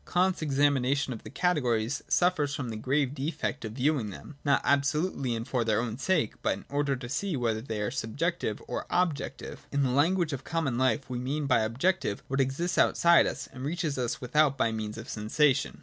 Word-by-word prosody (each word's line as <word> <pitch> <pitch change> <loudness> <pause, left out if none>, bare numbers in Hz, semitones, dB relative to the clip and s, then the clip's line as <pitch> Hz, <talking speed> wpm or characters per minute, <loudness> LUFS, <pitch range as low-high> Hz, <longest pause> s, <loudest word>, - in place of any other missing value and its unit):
(2) - - -15
Kant's 185 0 +2
examination 140 -2 +2
of 115 - -8
the - - -10
categories 125 -8 0
suffers 155 -6 +2
from 130 -4 -4
the 110 - -4
grave 135 +4 0
defect 150 0 -3
of 110 -1 -5
viewing 130 -3 +1
them, 135 +8 -10
not 140 -1 +3
absolutely 140 -2 +1
and 115 +1 -5
for 125 -3 0
their 110 -1 +1
own 115 -2 -2
sake, 160 +5 +1
but - - +1
in - - -13
order 145 -1 0
to 125 -1 -7
see 170 +5 -2
whether 115 -3 0
they 110 -3 -4
are 105 +2 -1
subjective 130 - -2
or - - -4
objective. 175 -5 -2
In 140 0 +1
the 130 - +1
language 160 +4 +2
of 135 -1 -5
common 160 -6 -1
life 130 +2 +1
we 125 -1 -4
mean 140 +4 -2
by 135 -4 +3
objective 115 - 0
what 135 +1 +1
exists 155 +7 -1
outside 170 0 +5
of - - -1
us - - -8
and 130 -1 -8
reaches 155 0 -1
us 125 -1 -1
from - - -8
with 125 - -12
out 150 -3 +4
by 115 -3 +2
means 110 -1 -4
of 115 +2 -8
sensation. 130 +6 +1
135 Hz, 215 wpm, -29 LUFS, 120-150 Hz, -, outside